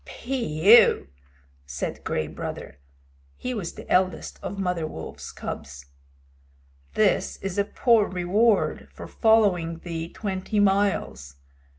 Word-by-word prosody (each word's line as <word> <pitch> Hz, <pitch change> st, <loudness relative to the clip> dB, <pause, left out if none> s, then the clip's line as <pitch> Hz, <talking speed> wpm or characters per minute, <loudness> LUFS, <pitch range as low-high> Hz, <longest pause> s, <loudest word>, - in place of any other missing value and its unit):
"Phew!" 225 Hz, -, +3 dB, 0.6 s
said 65 Hz, 0 st, -5 dB
Gray 80 Hz, -, -1 dB
Brother 75 Hz, -, -7 dB, 0.6 s
(he 250 Hz, -, -4 dB
was 195 Hz, -8 st, -4 dB
the -, -, -10 dB
eldest 185 Hz, -2 st, 0 dB
of 200 Hz, -, -6 dB
Mother 180 Hz, -4 st, -1 dB
Wolf's 80 Hz, -, -8 dB
cubs). 70 Hz, +1 st, -7 dB, 1.1 s
"This -, -, +2 dB
is 195 Hz, 0 st, -4 dB
a 200 Hz, -, +2 dB
poor 230 Hz, -1 st, +3 dB
reward 195 Hz, +5 st, +1 dB
for -, -, -10 dB
following 195 Hz, -7 st, +2 dB
thee 165 Hz, -1 st, -5 dB
twenty 200 Hz, +1 st, -3 dB
miles. 195 Hz, -, 0 dB
185 Hz, 110 wpm, -25 LUFS, 165-210 Hz, 1.1 s, Phew